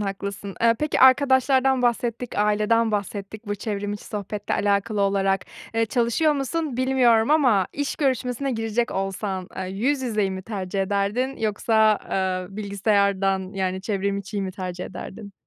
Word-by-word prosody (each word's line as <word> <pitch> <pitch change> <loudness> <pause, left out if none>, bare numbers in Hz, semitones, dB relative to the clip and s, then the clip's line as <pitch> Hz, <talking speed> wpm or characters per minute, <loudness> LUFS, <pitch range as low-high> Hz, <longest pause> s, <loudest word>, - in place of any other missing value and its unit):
haklısın. 200 0 -4
Eee, 230 0 +5
peki 300 0 0
arkadaşlardan 260 0 +5
bahsettik, 240 -1 -1
aileden 215 +2 +2
bahsettik 205 +1 -4
bu 205 - -1
çevrim 205 0 -3
içi 205 - -7
sohbetle 205 0 -4
alakalı 205 +1 0
olarak. 195 -1 +2 0.3
Eee, 225 0 +2
çalışıyor 240 +7 +2
musun 285 -1 -2
bilmiyorum 255 -2 +3
ama 250 - +4
iş 285 0 -3
görüşmesine 265 -1 0
girecek 225 +1 -1
olsan, 190 -1 -3
eee, 190 - -3
yüz 260 +9 -1
yüzeyi 215 -5 0
mi 190 0 -5
tercih 195 -2 -3
ederdin 205 +7 -1
yoksa, 220 0 +2
eee, 185 0 -2
bilgisayardan, 200 -2 +1
yani, 190 -1 -1
çevrim 200 0 -1
içiyi 200 0 -4
mi 190 -1 -4
tercih 180 -2 -5
ederdin? 200 +1 -8
210 Hz, 145 wpm, -24 LUFS, 195-240 Hz, 0.3 s, Eee